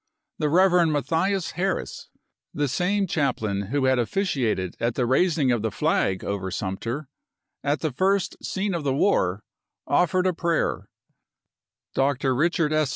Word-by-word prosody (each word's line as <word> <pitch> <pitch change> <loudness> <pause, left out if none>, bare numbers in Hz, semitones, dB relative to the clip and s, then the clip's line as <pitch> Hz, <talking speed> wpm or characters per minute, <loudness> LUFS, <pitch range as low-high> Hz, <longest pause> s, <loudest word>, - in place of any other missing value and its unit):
The 150 -2 +1
Rev. 180 +1 +4
Matthias 165 +5 0
Harris, 190 +1 -3 0.5
the 145 0 +1
same 195 +9 0
chap 150 -6 0
lain 100 -2 -2
who 135 +4 0
had 130 -1 +3
officiated 120 - -1
at 115 0 -1
the 125 - +1
raising 145 +1 +2
of 120 -3 +1
the 110 - 0
flag 95 -1 0
over 100 -2 -3
Sumter, 115 +9 -4 0.6
at 145 +2 0
the 155 - -1
first 190 +7 0
scene 195 0 -2
of 170 -3 -2
the 135 -2 0
war, 105 - +1 0.4
offered 180 +1 +2
a 185 - +2
prayer; 170 0 -1 1.0
Dr. 135 -1 +1
Richard 155 +2 +1
S. 155 -3 +2
145 Hz, 150 wpm, -25 LUFS, 120-180 Hz, 1.0 s, Rev